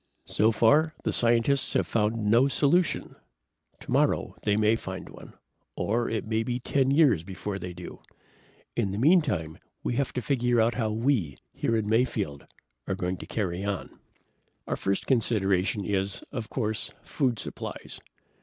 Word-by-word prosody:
"So 110 +2 +2
far, 150 +8 +3
the - - -1
scientists 120 +4 +3
have - - +2
found 110 0 +1
no 115 +6 +5
solution. 150 +5 +1 0.6
Tomorrow, - - +1
they 105 0 +1
may 110 +1 +4
find 95 -4 -6
one. - - -13 0.4
Or 115 +3 0
it 110 - -2
may 110 0 0
be 120 +2 -2
10 135 +1 +1
years 135 - +4
before 95 +2 -5
they 90 0 -6
do. 90 0 -10 0.7
In 100 - 0
the 100 - -4
meantime, 135 - +2 0.2
we 120 - -1
have 140 - 0
to 125 - -2
figure 125 -3 +1
out 115 +1 +3
how 115 -3 -1
we, 110 - 0 0.2
here 115 - 0
in 105 -2 -1
Mayfield, 110 - 0 0.4
are 95 - -1
going 90 -1 -2
to - - -9
carry 95 -3 -2
on. 100 -3 -4 0.7
"Our - - -2
first 100 0 -1
consideration 100 -5 +1
is, 95 -1 -1
of 120 -6 -5
course, 110 -4 -2
food 130 -6 0
supplies. - - -7
110 Hz, 155 wpm, -27 LUFS, 100-125 Hz, 0.7 s, no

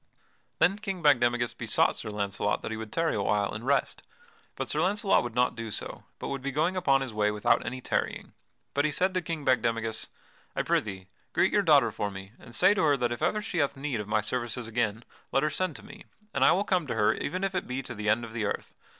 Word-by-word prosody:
Then 195 +4 +3
King 195 -5 -4
Bagdemagus 120 -4 +3
besought - - +2
Sir - - -6
Launcelot 100 0 -1
that - - -4
he 110 - -3
would 110 -1 -7
tarry 165 -1 +1
awhile 105 -1 +1
and 110 - -6
rest, 140 +2 +1 0.5
but - - -3
Sir 150 - +1
Launcelot 200 +3 +3
would 120 -2 -6
not 125 0 +3
do 115 -1 -5
so, - - -6
but - - -5
would 140 -1 -3
be 140 +1 -3
going 160 +6 +1
upon 140 -7 +3
his 130 -4 -4
way 105 0 +2
without 105 +3 +2
any 130 +3 -5
tarrying. - - -2 0.4
But 145 - +2
he 150 - +1
said 185 +5 +1
to 185 - 0
King 160 -3 -4
Bagdemagus: 115 -3 +1 0.5
"I - - 0
prithee 95 -3 -1 0.3
greet - - +3
your 205 - +4
daughter 145 - +5
for 105 0 -2
me, 95 0 -9
and 120 - -8
say 195 - +6
to 200 - 0
her 145 -3 +4
that 120 -2 0
if 120 - -4
ever 210 0 +1
she 175 - -3
hath 140 -2 +1
need 135 -4 -2
of 105 - -5
my 105 0 +2
services 120 +1 -3
again 115 -1 -1 0.3
let 135 - +2
her 155 - +1
send 180 0 -1
to - - -11
me, 210 - -12 0.3
and - - +2
I - - +7
will 195 - +2
come 180 -6 0
to - - -2
her 105 -2 +3
even 185 +6 -3
if 195 0 0
it 185 - -2
be 130 +2 -3
to - - -7
the 105 -1 -2
end 115 +2 +2
of 110 - -11
the 110 -2 -1
earth. - - -3
125 Hz, 245 wpm, -28 LUFS, 110-160 Hz, 0.5 s, I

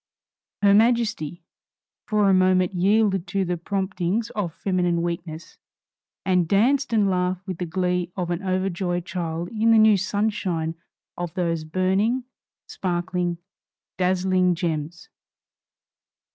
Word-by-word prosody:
Her 200 -1 +6
Majesty, 220 -7 +1 0.6
for 210 -2 +2
a 195 - +5
moment, 185 0 +3
yielded 195 0 +2
to 195 -2 -1
the 180 0 -1
promptings 190 +4 -2
of 200 -6 -3
feminine 175 -1 0
weakness, 170 -1 -5 0.7
and 180 -3 +2
danced 260 - +2
and 215 -3 +3
laughed 185 0 -1
with 185 -4 -5
the 180 - -3
glee 180 0 -1
of 175 -2 -2
an 175 +1 -2
overjoyed 185 -2 -1
child 170 -1 -4
in 225 +1 +1
the 225 - +6
new 215 -1 +6
sunshine 190 -5 -1 0.4
of 175 -2 -5
those 170 -3 -1
burning, 190 +9 0 0.4
sparkling, 175 -1 -2 0.6
dazzling 185 0 +2
gems. 165 -1 -3
185 Hz, 120 wpm, -24 LUFS, 175-200 Hz, 0.7 s, Her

